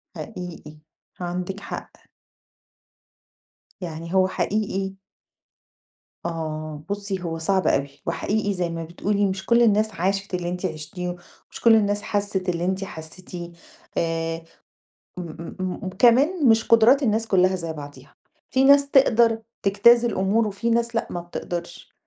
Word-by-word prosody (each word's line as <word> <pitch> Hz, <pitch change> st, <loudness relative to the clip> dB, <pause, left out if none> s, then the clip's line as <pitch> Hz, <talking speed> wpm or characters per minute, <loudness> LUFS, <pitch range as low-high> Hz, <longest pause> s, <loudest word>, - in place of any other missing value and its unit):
حقيقي، 175 Hz, -6 st, -8 dB, 0.4 s
عندِك 180 Hz, +2 st, -3 dB
حق. -, -, -7 dB, 1.9 s
يعني 165 Hz, 0 st, -6 dB
هو 185 Hz, 0 st, +4 dB
حقيقي 195 Hz, 0 st, -1 dB, 1.3 s
آه، 155 Hz, -2 st, -4 dB
بُصّي 200 Hz, -2 st, -3 dB
هو 165 Hz, -1 st, -3 dB
صعب 190 Hz, +3 st, +1 dB
أوي 140 Hz, +1 st, +2 dB, 0.2 s
وحقيقي 205 Hz, -1 st, -1 dB
زي 180 Hz, -2 st, -1 dB
ما 165 Hz, 0 st, -4 dB
بتقولي، 200 Hz, +5 st, -1 dB
مش 190 Hz, 0 st, -2 dB
كلّ 235 Hz, 0 st, +4 dB
الناس 215 Hz, 0 st, +3 dB
عاشت 195 Hz, +2 st, -1 dB
اللي 175 Hz, -1 st, -1 dB
أنتِ 180 Hz, +1 st, -4 dB
عِشتيه، 175 Hz, +2 st, -4 dB, 0.4 s
مش -, -, -9 dB
كلّ 230 Hz, -1 st, +7 dB
الناس 205 Hz, -1 st, +2 dB
حسّت 200 Hz, -3 st, -1 dB
اللي 170 Hz, 0 st, -1 dB
أنتِ 190 Hz, +1 st, -1 dB
حسّيتيه 175 Hz, 0 st, -8 dB, 0.5 s
آآ، 165 Hz, 0 st, -1 dB, 0.8 s
م -, -, -3 dB, 0.4 s
م 185 Hz, -1 st, -2 dB
م -, -, -1 dB
كمان 275 Hz, +5 st, +5 dB
مش 225 Hz, 0 st, +5 dB
قُدُرات 230 Hz, +5 st, +5 dB
الناس 225 Hz, -2 st, +1 dB
كلّها 185 Hz, -1 st, +3 dB
زي 165 Hz, -2 st, -4 dB
بعضيها، 145 Hz, -2 st, -11 dB, 0.4 s
في 260 Hz, +1 st, +3 dB
ناس 280 Hz, 0 st, +6 dB
تقدَر 235 Hz, -4 st, +5 dB, 0.2 s
تجتاز 230 Hz, +5 st, +5 dB
الأمور 215 Hz, 0 st, +1 dB
وفي 230 Hz, +4 st, -2 dB
ناس 235 Hz, 0 st, +1 dB
لأ 230 Hz, -, 0 dB
ما 175 Hz, -, -3 dB
بتقدَرش، 175 Hz, 0 st, -6 dB
190 Hz, 135 wpm, -24 LUFS, 175-220 Hz, 1.9 s, كلّ